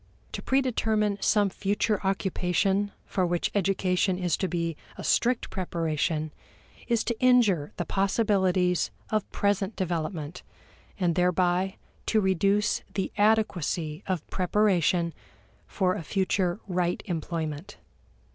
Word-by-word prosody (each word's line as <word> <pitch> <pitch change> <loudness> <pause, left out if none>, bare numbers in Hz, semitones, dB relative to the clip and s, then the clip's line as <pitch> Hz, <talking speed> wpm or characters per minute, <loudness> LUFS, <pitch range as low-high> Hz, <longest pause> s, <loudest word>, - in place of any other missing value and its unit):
To - - -5
predetermine 220 -6 +1
some 205 -2 +3
future 205 +2 0
occupation 195 +1 0
for 185 - -1
which 175 -1 0
education 190 -1 +1
is 180 -3 +1
to 190 - -1
be 170 -2 -2 0.2
a - - -7
strict 245 0 +1
preparation 160 -4 -1 0.5
is 235 -2 +1
to 235 -1 -2
injure 230 -12 +4
the 175 - -2
possibilities 190 -2 +2 0.2
of 215 -2 -1
present 200 0 0
development 165 -3 -3 0.6
and 175 -3 +2
thereby 180 +1 +1 0.3
to 220 - +3
reduce 195 +2 +2
the 195 - -1
adequacy 180 -7 +1
of 185 -5 -2
preparation 180 -3 +2 0.5
for 185 -2 +1
a - - -4
future 185 +1 0
right 180 -2 -1
employment. 165 +1 -4
185 Hz, 115 wpm, -27 LUFS, 175-205 Hz, 0.6 s, injure